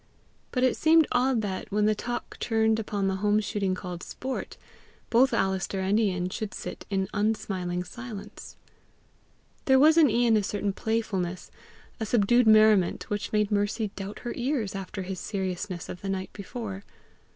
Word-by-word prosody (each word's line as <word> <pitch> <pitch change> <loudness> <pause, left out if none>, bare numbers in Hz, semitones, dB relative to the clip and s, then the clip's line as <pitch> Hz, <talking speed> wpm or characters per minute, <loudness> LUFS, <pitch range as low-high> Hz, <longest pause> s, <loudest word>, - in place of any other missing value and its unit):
But 255 - -1
it 255 - +3
seemed 320 0 +5
odd 250 -2 +2
that, 190 -1 -4
when 210 +1 +2
the 215 - +4
talk 240 +3 -5
turned 220 -1 +2
upon 205 -2 -1
the 190 0 0
home 210 +2 +2
shooting 205 -3 -1
called 180 -2 -6
sport, 260 +6 -5 0.5
both 250 +3 +5
Alister 190 0 0
and 195 +3 +2
Ian 185 -4 0
should 210 +2 -5
sit - - -7
in 190 -2 0
unsmiling 200 -4 -1
silence. 235 0 -9 1.1
There 265 -1 +5
was 315 +4 +6
in 300 -4 +6
Ian 230 0 +3
a - - +2
certain 200 0 -2
playfulness, 195 -5 -2 0.5
a 220 - -2
subdued 240 +2 +3
merriment, 215 -5 +4
which 205 0 -2
made 210 -1 +1
Mercy 205 +1 0
doubt 195 +1 -6
her 240 - -4
ears 245 -5 -1
after 195 0 -5
his 185 0 -5
seriousness 185 -2 -4
of 180 - -8
the 195 - -4
night 190 -1 -3
before. 200 -1 -6
210 Hz, 160 wpm, -27 LUFS, 190-230 Hz, 1.1 s, was